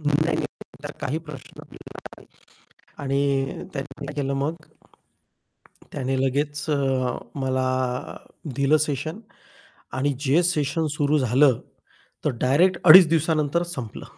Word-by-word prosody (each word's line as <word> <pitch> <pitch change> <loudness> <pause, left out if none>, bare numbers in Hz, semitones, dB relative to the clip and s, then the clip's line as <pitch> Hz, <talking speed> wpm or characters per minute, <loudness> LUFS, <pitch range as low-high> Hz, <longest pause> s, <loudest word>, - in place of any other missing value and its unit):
नाही, 145 -1 +1 0.2
नाही. - - -1 0.4
तसला - - -6
काही 150 +5 -2
प्रश्न 140 -4 -10
पडला - - -14 1.1
नाही - - -32
आणि 135 0 -1
त्यांनी 140 +1 -7
केलं 140 -2 -2
मग 140 +4 -1 1.4
त्याने 135 -1 -2
लगेच 145 +3 -1
अ, 135 -3 0 0.2
मला 130 -1 0 0.9
दिलं 140 +4 +3
सेशन 155 +5 -4 0.8
आणि 140 +2 +1
जे 145 +4 +3
सेशन 160 -2 0
सुरू 150 +1 +2
झालं 130 0 +3 0.6
तर - - +2
डायरेक्ट 170 +8 +3
2.5 175 0 +10
दिवसानंतरच 160 +1 0
संपलं. 120 -7 -7
145 Hz, 115 wpm, -24 LUFS, 135-155 Hz, 1.4 s, 2.5